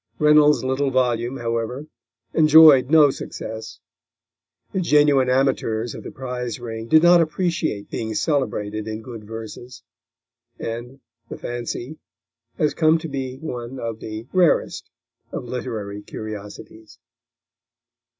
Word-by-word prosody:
Reynolds' 150 -1 +5
little 130 +2 0
volume, 125 -1 0
however, 115 +4 -3 0.5
enjoyed 155 -4 +7
no 150 -3 +6
success. 110 -3 -8 0.9
The 190 - 0
genuine 145 -5 +4
amateurs 125 -3 0
of - - -8
the - - -8
prize 125 -2 -5
ring 115 -1 -6
did 155 +5 +5
not 175 0 +7
appreciate 160 - -2
being 110 -1 -4
celebrated 110 -8 -1
in 110 0 -5
good 115 -2 -9
verses, 115 +2 -9 0.7
and 120 +4 -6 0.3
The - - -7
Fancy 120 +4 -5 0.6
has 150 -1 +1
come 160 0 +3
to 165 0 -6
be 130 -3 -5
one 125 -3 -6
of 115 -1 -5
the 110 +1 -7
rarest 180 -4 +2 0.4
of - - -5
literary 110 -5 -5
curiosities. 110 +1 -9
125 Hz, 120 wpm, -22 LUFS, 115-150 Hz, 0.9 s, enjoyed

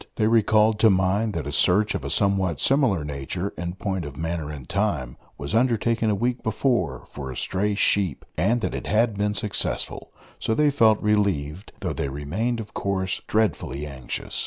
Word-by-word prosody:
They 110 - +1
recalled 110 -1 +3
to 110 - +6
mind 100 +3 +1
that 80 -4 -3
a 75 - -4
search 100 +8 +3
of - - -3
a - - -4
somewhat 95 -4 +2
similar 130 - +3
nature, 75 +7 -4
in 85 +1 -4
point 95 -2 -3
of 70 -2 -8
manner 80 -2 -3
and 70 -5 -8
time, 80 - -1 0.2
was 70 +5 -5
undertaken 115 -1 +2
a 105 - +2
week 120 +4 -1
before 110 - 0
for 70 -3 -8
a 65 - -6
stray 100 +2 0
sheep, 100 -6 +1
and 115 +9 +1
that - - -2
it - - -5
had 110 +1 +2
been 105 +1 0
successful; 100 0 -1 0.3
so 110 - 0
they 150 +2 +3
felt 110 -6 +4
relieved, 100 -5 0
though - - -2
they 70 - -2
remained, 95 - -2
of 105 -2 -8
course, 95 -1 -2
dreadfully 90 - 0
anxious. 65 -4 -5
100 Hz, 185 wpm, -24 LUFS, 80-110 Hz, 0.3 s, to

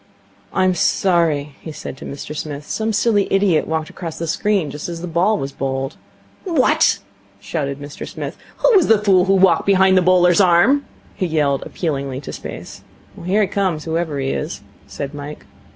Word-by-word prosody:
'I'm 185 0 +2
sorry,' 160 -5 +1
he 160 - -7
said 150 - -7
to - - -10
Mr 145 +2 -7
Smith. 145 -1 -5
'Some 220 0 -1
silly 205 -1 +1
idiot 195 -5 +2
walked 160 -1 -2
across 165 -3 -7
the 165 - -3
screen 180 -1 0
just 150 +4 -6
as 170 -1 -6
the 180 - -5
ball 180 +6 +2
was 135 -5 -4
bowled.' 135 +1 -3 0.5
'What!' 330 -9 +3 0.4
shouted 140 -4 -3
Mr 145 0 -8
Smith. - - -6 0.2
'Who - - +4
was 370 -5 +5
the 225 - +6
fool 195 -3 +3
who 195 0 +3
walked 185 -3 +4
behind 190 -1 +5
the 185 - +5
bowler's 180 0 +4
arm?' 190 +11 +4 0.3
he 185 - -2
yelled 145 -4 +1
appealingly 140 -6 -3
to - - -8
Space. - - -8 0.4
'Here 195 +5 +2
he - - +1
comes, 185 -5 -1
whoever 160 -2 -2
he 135 -1 -1
is,' 100 - -4 0.3
said 135 +9 -6
Mike. 145 +1 -8
170 Hz, 180 wpm, -19 LUFS, 145-195 Hz, 0.5 s, the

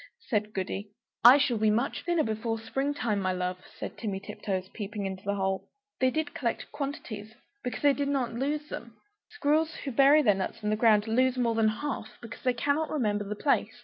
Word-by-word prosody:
said 210 -2 0
Goody. 195 +1 -3 0.3
"I 245 +4 +10
shall 260 -6 +1
be 215 0 +4
much 235 +6 0
thinner 345 -2 +2
before 225 +1 -2
spring 270 +6 -2
time, 215 -7 0
my 185 -1 0
love," 180 0 -2 0.2
said - - -6
Timmy 200 -4 -2
Tiptoes, 190 -1 -4
peeping 205 -1 -4
into 190 -1 -5
the 200 0 -1
hole. 190 -1 -1 0.3
They 260 - +4
did 310 +3 -2
collect 235 -4 -3
quantities 225 -6 -5 0.3
because 250 - -4
they 285 -1 +6
did 285 0 -1
not 265 -4 0
lose 295 +5 -2
them! 235 -2 -7 0.3
Squirrels 315 -6 +1
who 275 - -2
bury 280 +5 +6
their 210 - +5
nuts 190 +3 -4
in 210 - +1
the - - +3
ground 215 -1 +4
lose 255 +3 +2
more 235 -2 +2
than 225 -1 +3
half, 220 0 -3
because 230 -1 -10
they 255 - +2
cannot 285 +6 0
remember 210 -8 0
the 210 +1 -4
place. 280 +6 +1
230 Hz, 205 wpm, -29 LUFS, 210-280 Hz, 0.3 s, I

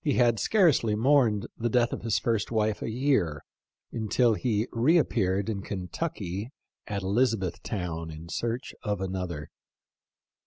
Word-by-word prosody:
29 130 -5 +3
had 115 -2 +2
scarcely 155 - +3
mourned 115 -3 +3
the 120 +1 -1
death 120 0 +2
of - - -4
his 115 -2 +1
first 115 -4 0
wife 110 -2 0
a - - -2
year 115 - +1 0.5
until 115 +1 +2
he 110 0 0
reappeared 115 - +2
in 105 -3 -2
Kentucky 95 - -4 0.4
at 100 -2 -3
Elizabeth 105 -2 +1
town 85 -5 -4
in 80 +1 -9
search 120 +8 -3
of 105 -4 -2
another. 90 -5 -4
110 Hz, 140 wpm, -28 LUFS, 95-120 Hz, 0.5 s, 29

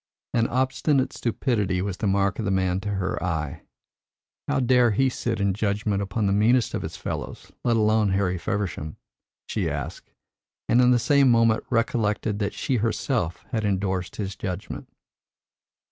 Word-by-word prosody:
An 115 -1 +2
obstinate 130 +2 +1
stupidity 110 -6 0
was 95 0 -2
the 105 - -1
mark 100 +1 +1
of 110 - -2
the - - 0
man 95 -1 +1
to 105 - -4
her 95 -1 -2
eye. 80 -5 -2 0.9
How - - +1
dare 125 -1 +4
he 130 +5 +2
sit 120 -3 -2
in 100 -1 +2
judgment 100 0 0
upon 100 +2 -1
the 100 - +2
meanest 115 +4 +3
of - - -2
his - - -6
fellows, - - -6
let 120 -2 +2
alone 110 -1 +3
Harry 95 -2 0
Feversham? 85 -6 -3 0.5
she - - -1
asked, - - -6 0.6
and 120 - +4
in 125 - +5
the 125 - +5
same 140 +2 +4
moment 115 -2 +4
recollected 110 -3 0
that 100 -1 -2
she 130 - 0
herself 110 - -1
had 110 -4 -1
endorsed 95 -2 -1
his 100 -2 -4
judgment. 90 0 -5
105 Hz, 160 wpm, -25 LUFS, 95-120 Hz, 0.9 s, in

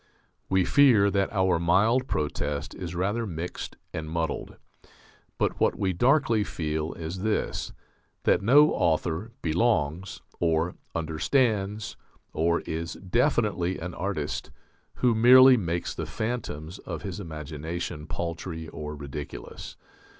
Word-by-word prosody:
We 95 -1 +3
fear 120 -8 +5
that 100 -1 +1
our 95 -4 +2
mild 105 +10 +3
protest 75 -1 -2
is 90 -1 -6
rather 105 +6 -1
mixed 85 -1 -5 0.2
and 80 0 -4
muddled. 80 -1 -3 0.8
But - - 0
what - - +2
we 95 -1 0
darkly 120 - +3
feel 80 -3 -3
is 85 +3 -6
this: 110 +1 -1 0.5
that - - +3
no 145 +9 +6
author 85 +6 0
"belongs," 85 -1 0 0.2
or 80 +1 +1 0.2
"understands," 105 - 0 0.4
or 85 +2 +1
is 80 +1 -4
"definitely 100 - 0
an 90 +1 -6
artist" 90 -6 -3 0.5
who 125 -2 +3
merely 130 +3 +8
makes 85 -6 -2
the - - -5
phantoms 100 -8 -4
of 85 -4 -6
his 95 -1 -5
imagination 80 -1 -5
paltry 85 +1 -4
or 75 0 -6
ridiculous. 70 0 -8
90 Hz, 120 wpm, -27 LUFS, 80-105 Hz, 0.8 s, merely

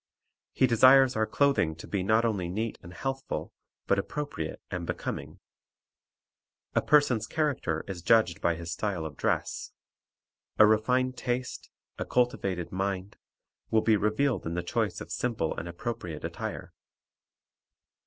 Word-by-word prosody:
He - - +3
desires 130 +2 +6
our 110 0 +1
clothing 135 - +2
to 80 - -10
be 100 - -2
not 110 +5 +3
only 100 -6 -1
neat 110 +5 -3
and 85 - -11
healthful, 135 +8 -4 0.3
but 100 - +2
appropriate 145 - -4
and 90 -2 -4
becoming. - - -5 1.3
A - - +3
person's 130 -7 +3
character 135 - -1
is 95 -3 -5
judged 110 -3 +3
by 85 -1 +2
his 85 0 -6
style 90 -2 -2
of 75 -2 -6
dress. - - -1 0.9
A 110 - +9
refined 125 +4 +2
taste, 125 0 -3 0.3
a - - -2
cultivated 95 -8 0
mind, 95 +1 -3 0.5
will 110 - +3
be 110 -1 +4
revealed 105 +1 +1
in 85 - -3
the 90 - -2
choice 85 - -1
of - - -8
simple 115 -10 -1
and 85 - -5
appropriate 85 -4 -5
attire. - - -5
110 Hz, 140 wpm, -29 LUFS, 85-125 Hz, 1.3 s, A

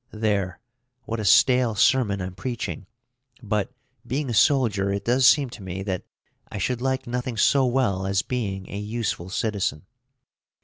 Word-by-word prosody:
There, 100 -4 -1 0.4
what 115 0 -4
a 105 - -3
stale 120 +2 +4
sermon 105 -2 +2
I'm 90 0 -5
preaching. 105 -2 -5 0.6
But, 105 -1 -1 0.3
being 130 +2 -2
a - - -2
soldier, 105 -4 +3
it 100 0 -3
does 125 +2 +4
seem 140 -4 +4
to 115 - -10
me 95 0 -5
that 95 -2 -3 0.5
I - - -5
should 120 +6 -1
like 130 0 -1
nothing 125 -1 -3
so 135 +5 +4
well 115 -7 0
as 95 0 +1
being 100 -7 -3
a 100 - -4
useful 105 -4 -3
citizen. 95 -6 -2
110 Hz, 160 wpm, -24 LUFS, 100-125 Hz, 0.6 s, stale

